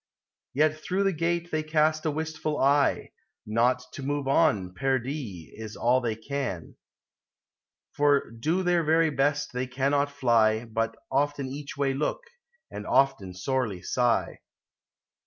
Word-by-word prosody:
Yet 155 +2 +2
through 185 +5 -1
the 195 -1 +2
gate 170 +1 -1
they 155 0 0
east 155 0 +1
a - - +3
wisful 155 0 -3
eye: 140 +1 +2 0.3
Not 120 +4 +2
to - - -7
move 140 0 -2
on, 135 - +2
perdie, 130 - -3
is 110 -1 -8
all 125 +2 +2
they 115 -3 -1
can: 115 - -4 1.2
For 145 -4 +2
do 155 +11 -1
their 175 -1 +2
very 160 +1 +3
best 145 +1 0
they 125 +1 -2
cannot 140 +3 +1
fly, 115 -5 +2
But 115 0 -2 0.2
often 140 0 0
each 140 +1 -7
way 140 -1 +1
look, 150 - -1 0.5
and 105 - -7
often 125 -9 +2
sorely 105 -2 -2
sigh. 120 +4 0
140 Hz, 140 wpm, -27 LUFS, 120-155 Hz, 1.2 s, a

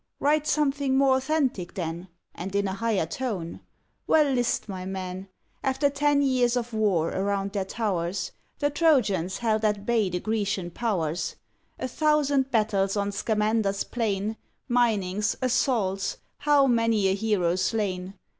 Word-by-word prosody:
Write 300 +1 +2
something 280 -3 +1
more 270 -1 +4
authentic 265 - -1
then, 170 0 -4 0.3
And 190 +3 -6
in 200 0 +1
a 190 - -2
higher 210 -4 0
tone." 185 -4 -4 0.5
Well, 300 -3 +4
list, 245 -3 0
my 190 -3 -5
men! 185 0 -5 0.4
After 275 +2 +1
ten 285 0 +2
years 250 -2 +2
of 240 -1 -3
war 195 -7 +2
around 195 0 -1
their 195 -2 -1
towers, 185 -4 -2 0.3
The 290 0 0
Trojans 215 - +2
held 220 -2 0
at 210 -1 0
bay 225 -4 +2
the 180 0 -2
Grecian 200 -4 -2
powers; 175 -7 -2 0.4
A 255 - -3
thousand 285 -1 +2
battles 210 -4 +1
on 200 0 0
Scamander's 210 -1 0
plain, 215 -2 -2 0.3
Minings, 210 -4 +1
assaults, 230 -6 0 0.2
how 285 -1 +4
many 230 -4 +2
a 190 - +2
hero 195 -4 +1
slain! 185 0 -1
215 Hz, 140 wpm, -26 LUFS, 190-255 Hz, 0.5 s, more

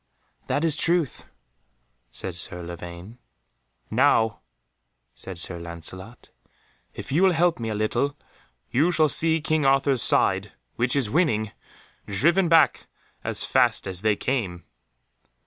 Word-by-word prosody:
"That 155 - 0
is 160 -3 +3
truth," 170 -3 0 0.9
said 95 - -5
Sir 85 +1 -4
Lavaine. 85 +6 -9 0.7
"Now," 110 0 +2 0.7
said 95 -2 -8
Sir 85 0 0
Lancelot, 85 +6 -9 0.6
"if - - -8
you 155 +6 +2
will 190 -1 +4
help 170 -1 +1
me 115 -1 -4
a 110 - -3
little, 140 +7 -1 0.5
you 155 +8 +2
shall 155 -2 +3
see 160 +2 +2
King 155 -1 0
Arthur's 135 -2 +2
side, - - +3 0.2
which 120 +2 0
is 125 -7 0
winning, 110 - +1 0.6
driven 170 - +2
back 165 -3 +3 0.4
as - - +1
fast - - +2
as 95 -2 -3
they 110 -1 +2
came." 100 -9 -3
125 Hz, 130 wpm, -24 LUFS, 95-155 Hz, 0.9 s, will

